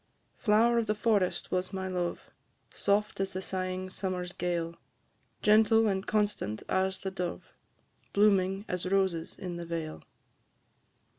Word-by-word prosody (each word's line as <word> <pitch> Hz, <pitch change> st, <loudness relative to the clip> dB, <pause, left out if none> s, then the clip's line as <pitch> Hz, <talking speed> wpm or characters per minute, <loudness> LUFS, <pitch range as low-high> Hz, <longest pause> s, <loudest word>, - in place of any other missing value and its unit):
Flower 235 Hz, +2 st, +4 dB
of 225 Hz, -, -1 dB
the 210 Hz, -, +1 dB
forest 210 Hz, -4 st, +1 dB
was 185 Hz, 0 st, 0 dB
my 190 Hz, -1 st, -3 dB
love, 180 Hz, -2 st, -3 dB, 0.4 s
Soft 205 Hz, +1 st, +1 dB
as 195 Hz, 0 st, -1 dB
the 185 Hz, -, -3 dB
sighing 185 Hz, 0 st, -3 dB
summer's 185 Hz, -2 st, -3 dB
gale, 170 Hz, -2 st, -2 dB, 0.7 s
Gentle 220 Hz, +1 st, +5 dB
and 195 Hz, -2 st, 0 dB
constant 205 Hz, -, 0 dB
as 190 Hz, 0 st, +1 dB
the 190 Hz, -, -4 dB
dove, 180 Hz, -2 st, -5 dB, 0.6 s
Blooming 195 Hz, -1 st, +3 dB
as 180 Hz, 0 st, -2 dB
roses 185 Hz, -4 st, 0 dB
in 180 Hz, -2 st, -5 dB
the 170 Hz, -, -5 dB
vale. 165 Hz, -2 st, -4 dB
190 Hz, 135 wpm, -30 LUFS, 180-205 Hz, 0.7 s, Gentle